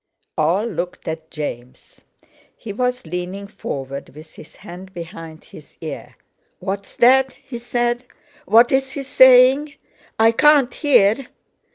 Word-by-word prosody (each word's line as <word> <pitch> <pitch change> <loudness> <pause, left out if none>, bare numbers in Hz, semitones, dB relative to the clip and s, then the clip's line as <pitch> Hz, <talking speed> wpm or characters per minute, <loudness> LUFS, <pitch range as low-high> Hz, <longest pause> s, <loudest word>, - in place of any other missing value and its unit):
All 170 +8 +1
looked 180 -5 -5
at 160 0 -6
James. 125 -5 -8 0.6
He 215 -4 -8
was 250 +1 -2
leaning 180 +4 -5
forward 140 -9 -7
with 155 +2 -14
his 155 - -15
hand 190 0 -12
behind 165 -2 -9
his - - -16
ear. - - -8 0.4
"What's 200 0 -6
that?" 260 +2 +4
he 245 -3 -10
said. 240 +1 -2 0.4
"What's 265 +5 +3
he 280 - -5
saying? 260 +2 +5 0.4
I 225 +1 +5
can't 290 +1 +4
hear." 250 -3 +2
215 Hz, 125 wpm, -20 LUFS, 170-255 Hz, 0.6 s, saying